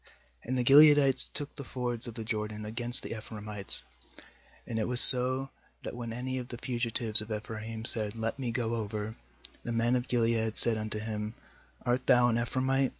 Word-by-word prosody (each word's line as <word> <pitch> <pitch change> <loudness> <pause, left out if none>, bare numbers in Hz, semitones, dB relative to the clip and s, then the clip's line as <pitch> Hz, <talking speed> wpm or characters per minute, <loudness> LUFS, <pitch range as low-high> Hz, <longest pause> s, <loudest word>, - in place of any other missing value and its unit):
5And 130 - -3
the 125 - -1
Gileadites 140 0 +6
took 145 -1 -4
the 140 - -9
fords 125 -2 -6
of 115 - -10
the 115 - -7
Jordan 105 -1 -6
against 120 +3 +4
the - - -7
Ephraimites; 105 -2 -7 0.8
and 115 -1 -5
it 110 - -3
was 125 0 0
so, 130 +2 +7 0.3
that - - -8
when 120 -1 -8
any 130 +2 -6
of 125 - -9
the 120 - -10
fugitives 115 -3 -2
of 110 +1 -11
Ephraim 110 +1 -8
said: 110 -2 -4
'Let 115 +3 -5
me 125 -3 -4
go 115 -1 -4
over7, 105 +1 -7 0.5
the 120 - -7
men 115 +2 -1
of 125 0 -4
Gilead 115 -2 -2
said 115 -2 +6
unto 110 0 -5
him: 105 0 -6 0.5
'Art 125 +1 -2
thou 120 0 +3
an 115 - -1
Ephraimite?' 130 +2 -2
115 Hz, 185 wpm, -28 LUFS, 110-125 Hz, 0.8 s, so